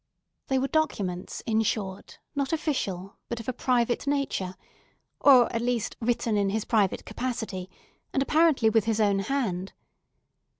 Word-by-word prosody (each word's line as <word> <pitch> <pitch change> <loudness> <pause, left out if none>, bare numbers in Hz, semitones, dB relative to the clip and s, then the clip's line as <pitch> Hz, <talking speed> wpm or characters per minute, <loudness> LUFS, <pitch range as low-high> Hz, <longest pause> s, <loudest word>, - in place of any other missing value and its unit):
They 265 - +1
were 265 +1 +1
documents, 200 - -1
in 220 -1 +2
short, 200 -3 -3 0.2
not 280 -2 -1
official, 205 - -2
but 235 - -3
of 230 - -9
a 255 - -1
private 245 +1 +1
nature, 275 -10 -1 0.6
or, 260 -4 +7
at 230 - 0
least, 240 -2 -1
written 230 -2 +1
in 200 -1 +2
his 215 +2 -1
private 210 -5 +1
capacity, 220 -7 -4 0.4
and 270 - +1
apparently 305 -7 +4
with 225 -2 +3
his 225 -1 0
own 200 -2 +3
hand. 195 -6 -2
230 Hz, 145 wpm, -27 LUFS, 200-265 Hz, 0.6 s, or